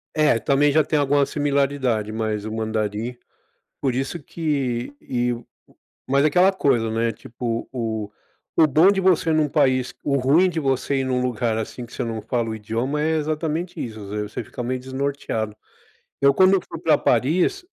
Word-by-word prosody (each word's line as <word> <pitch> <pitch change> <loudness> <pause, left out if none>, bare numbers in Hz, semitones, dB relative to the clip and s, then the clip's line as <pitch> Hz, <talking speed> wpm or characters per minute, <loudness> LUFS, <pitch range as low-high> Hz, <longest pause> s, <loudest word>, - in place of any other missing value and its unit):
É, 150 -7 +3
também 145 +4 +3
já 155 +2 +4
tem 155 +1 0
alguma 145 0 +3
similaridade, 140 -6 0
mas 110 -1 -2
o 110 - -4
mandarim, 110 +1 -2 0.6
por 135 -3 0
isso 135 +6 -3
que 140 -6 -2
e 120 -1 -1
u 120 - -6
u - - -23 0.6
mas 140 +1 +4
aquela 180 +5 +5
coisa, 130 -11 +1
né, 115 +1 0
tipo, 115 +1 -5
o 110 -4 -3 0.5
o 160 - +6
bom 155 +6 +5
de 195 - 0
você 180 -3 +3
num 155 -1 +3
país 130 -3 +1
o 140 - +1
ruim 145 +8 +4
de 165 -2 -2
você 135 -1 0
ir 135 - 0
num 130 -1 0
lugar 120 -2 -1
assim 115 +2 -5
que 120 - -17
você - - -3
não 115 -2 -4
fala 115 +1 -1
o 110 - -3
idioma 115 +7 -2
é 155 +1 +1
exatamente 155 +2 -2
isso, 110 -3 -7
você 105 +1 -4
fica - - -7
meio 130 +1 -2
desnorteado. 130 -5 -3 0.7
Eu 140 0 +5
quando 185 +6 +5
eu 195 - +3
fui 165 - -9
pra 160 -1 +3
Paris, 170 - +1
130 Hz, 180 wpm, -23 LUFS, 115-150 Hz, 0.7 s, o